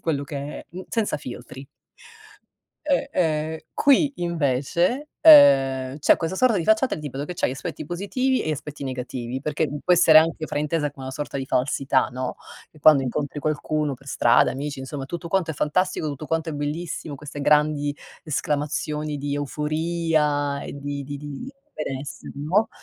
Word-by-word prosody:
quello 150 Hz, -4 st, -1 dB
che 145 Hz, -, -6 dB, 0.2 s
è, -, -, -15 dB
mhmm 185 Hz, +2 st, -8 dB
senza 225 Hz, -8 st, 0 dB
filtri. 130 Hz, -1 st, -9 dB, 1.2 s
Eh, 280 Hz, -1 st, +1 dB
ehm, 160 Hz, -2 st, 0 dB
qui 285 Hz, +1 st, +4 dB
invece, 170 Hz, -, 0 dB
uhm, 135 Hz, -, +7 dB
c'è 150 Hz, -, +5 dB
questa 165 Hz, +3 st, -3 dB
sorta 230 Hz, -2 st, +3 dB
di 165 Hz, -, -2 dB
facciata 220 Hz, +6 st, +3 dB
del 155 Hz, -, -8 dB
tipo 140 Hz, -1 st, -4 dB
che 180 Hz, -, -5 dB
c'hai 170 Hz, -, -1 dB
aspetti 155 Hz, +3 st, -6 dB
positivi 235 Hz, -, 0 dB
e 155 Hz, -, -2 dB
aspetti 150 Hz, -1 st, -5 dB
negativi, 125 Hz, -1 st, -4 dB
perché, 150 Hz, +2 st, -1 dB
mhmm, 145 Hz, +1 st, -5 dB
può 180 Hz, -, +4 dB
essere 165 Hz, -2 st, +7 dB
anche 160 Hz, 0 st, +1 dB
fraintesa 150 Hz, 0 st, -1 dB
come 135 Hz, -2 st, -11 dB
una 130 Hz, -, -4 dB
sorta 145 Hz, -1 st, -4 dB
di 135 Hz, -, -4 dB
falsità, 135 Hz, +1 st, +1 dB
no, 130 Hz, 0 st, -3 dB, 0.4 s
che 155 Hz, -, -20 dB
quando 145 Hz, -2 st, +6 dB
incontri 140 Hz, +3 st, -3 dB
qualcuno 150 Hz, -1 st, -1 dB
per 135 Hz, +2 st, -19 dB
strada, 120 Hz, -3 st, +4 dB
amici, 140 Hz, +1 st, -5 dB
insomma 135 Hz, +1 st, -6 dB
tutto 170 Hz, +3 st, -6 dB
quanto 180 Hz, -2 st, 0 dB
è -, -, -4 dB
fantastico, 160 Hz, +3 st, 0 dB
tutto 145 Hz, +1 st, -6 dB
quanto 165 Hz, 0 st, -1 dB
è -, -, -5 dB
bellissimo, 150 Hz, +1 st, -4 dB
queste 145 Hz, +1 st, -8 dB
grandi 150 Hz, 0 st, +2 dB, 0.3 s
esclamazioni 150 Hz, 0 st, -2 dB
di 145 Hz, 0 st, -3 dB
euforia 150 Hz, -1 st, 0 dB
e -, -, -7 dB
di 140 Hz, 0 st, -4 dB
di 145 Hz, +1 st, -6 dB
di 145 Hz, -, -7 dB, 0.2 s
benessere, 140 Hz, -1 st, -6 dB
no, 170 Hz, +10 st, +1 dB
150 Hz, 170 wpm, -24 LUFS, 140-165 Hz, 1.2 s, uhm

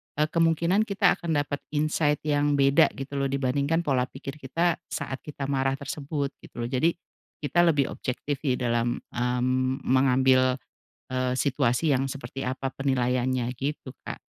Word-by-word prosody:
eee, 150 Hz, +1 st, +2 dB
kemungkinan 170 Hz, +5 st, +2 dB
kita 200 Hz, -1 st, +3 dB
akan 170 Hz, -1 st, -2 dB
dapat 145 Hz, 0 st, -4 dB, 0.2 s
insight 150 Hz, 0 st, +1 dB
yang 145 Hz, -1 st, +2 dB
beda 140 Hz, 0 st, +5 dB
gitu 135 Hz, +1 st, -5 dB
loh, 140 Hz, -, +1 dB
dibandingkan 140 Hz, +4 st, 0 dB
pola 130 Hz, -5 st, +1 dB
pikir 135 Hz, +2 st, -8 dB
kita, 165 Hz, +5 st, 0 dB
saat 135 Hz, -, -4 dB
kita 145 Hz, -2 st, -6 dB
marah 135 Hz, -1 st, +1 dB
tersebut, 140 Hz, 0 st, -3 dB
gitu -, -, -15 dB
loh. 120 Hz, -, -3 dB
Jadi, 150 Hz, +6 st, +2 dB, 0.5 s
kita 175 Hz, +4 st, +2 dB
lebih 150 Hz, -6 st, +3 dB
objektif 140 Hz, +3 st, -3 dB
ya 130 Hz, -4 st, +2 dB
dalam, 120 Hz, -1 st, +1 dB
mmm, 130 Hz, +2 st, -1 dB
mengambil, 130 Hz, 0 st, +4 dB, 0.6 s
eee, 130 Hz, 0 st, 0 dB
situasi 140 Hz, +1 st, +1 dB
yang 135 Hz, +1 st, 0 dB
seperti 135 Hz, 0 st, -7 dB
apa 130 Hz, +1 st, -2 dB
penilaiannya, 130 Hz, -2 st, 0 dB
gitu 140 Hz, +1 st, -4 dB
Kak. -, -, -6 dB
135 Hz, 150 wpm, -26 LUFS, 130-150 Hz, 0.6 s, beda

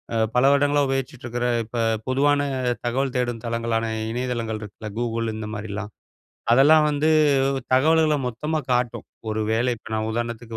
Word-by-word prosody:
அ -, -, +1 dB, 0.2 s
பல 125 Hz, -, +4 dB
வருடங்களா 145 Hz, +1 st, +3 dB
உபயோகிச்சிட்டு 135 Hz, 0 st, -3 dB
இருக்கிற 120 Hz, 0 st, -2 dB, 0.2 s
இப்ப 115 Hz, +2 st, -5 dB, 0.3 s
பொதுவான 145 Hz, +2 st, +2 dB, 0.4 s
தகவல் 130 Hz, +3 st, 0 dB
தேடும் 120 Hz, -2 st, -1 dB
தளங்களான 115 Hz, -1 st, -1 dB, 0.3 s
இணையதளங்கள் 115 Hz, -3 st, -3 dB
இருக்குல்ல. 105 Hz, +1 st, -9 dB
Google 115 Hz, -1 st, -1 dB
இந்த 110 Hz, 0 st, -5 dB
மாரிலாம், 105 Hz, 0 st, -5 dB, 0.6 s
அதெல்லாம் 150 Hz, +5 st, +6 dB
வந்து 150 Hz, +2 st, +1 dB, 0.7 s
தகவல்கள 155 Hz, +2 st, +4 dB
மொத்தமா 150 Hz, +7 st, -2 dB
காட்டும். 125 Hz, -1 st, -1 dB, 0.3 s
ஒரு 110 Hz, 0 st, -2 dB
வேளை 120 Hz, +3 st, +1 dB
இப்ப 110 Hz, -, -13 dB
நான் 110 Hz, 0 st, -1 dB
உதாரணத்துக்கு 120 Hz, -1 st, -4 dB
120 Hz, 140 wpm, -23 LUFS, 115-135 Hz, 0.7 s, அதெல்லாம்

